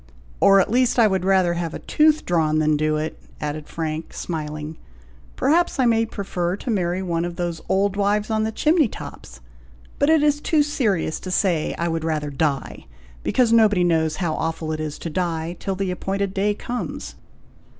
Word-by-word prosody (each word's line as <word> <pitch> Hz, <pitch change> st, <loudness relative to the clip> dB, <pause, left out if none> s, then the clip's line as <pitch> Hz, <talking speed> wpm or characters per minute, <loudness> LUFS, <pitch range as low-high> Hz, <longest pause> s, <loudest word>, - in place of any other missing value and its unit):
"Or, 195 Hz, 0 st, +6 dB
at 195 Hz, -, +1 dB
least, 250 Hz, +1 st, +2 dB
I 235 Hz, -, +6 dB
would 190 Hz, -3 st, +1 dB
rather 185 Hz, -2 st, +3 dB
have 170 Hz, -1 st, -3 dB
a -, -, -9 dB
tooth 310 Hz, 0 st, +3 dB
drawn 160 Hz, -3 st, +1 dB
than 155 Hz, -1 st, +3 dB
do 155 Hz, +1 st, +1 dB
it," 155 Hz, +1 st, -4 dB, 0.2 s
added 150 Hz, 0 st, -4 dB
Frank, 160 Hz, 0 st, -4 dB
smiling. 155 Hz, -1 st, -5 dB, 0.6 s
"Perhaps 325 Hz, +6 st, +2 dB
I 255 Hz, -, +4 dB
may 225 Hz, -1 st, +3 dB
prefer 185 Hz, -4 st, -2 dB
to 240 Hz, -, -4 dB
marry 185 Hz, -2 st, 0 dB
one 170 Hz, -2 st, -1 dB
of 175 Hz, 0 st, -4 dB
those 175 Hz, -2 st, -3 dB
old 195 Hz, +1 st, +2 dB
wives 205 Hz, +2 st, +1 dB
on 215 Hz, 0 st, +1 dB
the 220 Hz, -, -1 dB
chimney 310 Hz, +5 st, +3 dB
tops; -, -, -10 dB, 0.6 s
but 285 Hz, -, +3 dB
it 320 Hz, -2 st, +4 dB
is 295 Hz, 0 st, +2 dB
too 305 Hz, -1 st, +3 dB
serious 215 Hz, -, 0 dB
to 185 Hz, -, -7 dB
say 180 Hz, -4 st, +1 dB
I 170 Hz, -, -1 dB
would 165 Hz, -1 st, -2 dB
rather 155 Hz, -2 st, -2 dB
die, 140 Hz, -1 st, -2 dB, 0.3 s
because 240 Hz, -, +2 dB
nobody 210 Hz, -5 st, +5 dB
knows 160 Hz, -2 st, +2 dB
how 170 Hz, -4 st, -1 dB
awful 160 Hz, 0 st, -3 dB
it 155 Hz, -, -3 dB
is 155 Hz, -1 st, -4 dB
to 165 Hz, -, -5 dB
die, 170 Hz, 0 st, -2 dB
till 195 Hz, -, -3 dB
the 190 Hz, -1 st, -2 dB
appointed 195 Hz, +1 st, -2 dB
day 205 Hz, +1 st, +1 dB
comes." 245 Hz, +3 st, -5 dB
180 Hz, 190 wpm, -22 LUFS, 160-215 Hz, 0.6 s, Or